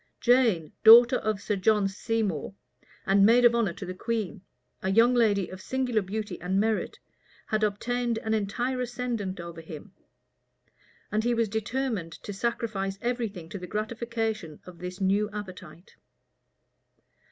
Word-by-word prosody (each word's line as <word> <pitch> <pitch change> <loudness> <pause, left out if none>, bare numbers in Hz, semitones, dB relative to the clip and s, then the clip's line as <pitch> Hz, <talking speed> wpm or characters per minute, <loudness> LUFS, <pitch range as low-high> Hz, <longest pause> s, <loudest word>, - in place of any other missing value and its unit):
Jane, 235 - +3
daughter 235 +3 +9
of 215 -2 -2
Sir 210 +1 -2
John 205 +1 +2
Seymour, 200 -4 -2 0.5
and 195 +1 +4
maid 235 +4 +6
of 235 - +6
honor 230 -7 +1
to - - -8
the 185 - -5
queen, 215 -1 -3 0.4
a 190 - -1
young 230 +5 +5
lady 210 -6 +2
of 185 0 -9
singular 255 -3 0
beauty 205 -1 -5
and 185 +2 0
merit, 220 +1 -1 0.5
had 215 0 -1
obtained 235 +3 -1
an 220 0 -2
entire 240 +5 -1
ascendant 240 -6 -3
over 170 -1 -8
him; 160 +4 -10 1.2
and 215 +1 0
he 240 0 +1
was 230 -2 +1
determined 220 -5 -2
to 205 - -8
sacrifice 215 -3 -2
every 240 0 -1
thing 180 -5 -10
to 200 - -6
the 180 - -8
gratification 220 -4 -3
of 180 -2 -12
this 180 +1 -7
new 200 +2 +1
appetite. 185 -5 -9
215 Hz, 150 wpm, -27 LUFS, 190-235 Hz, 1.2 s, daughter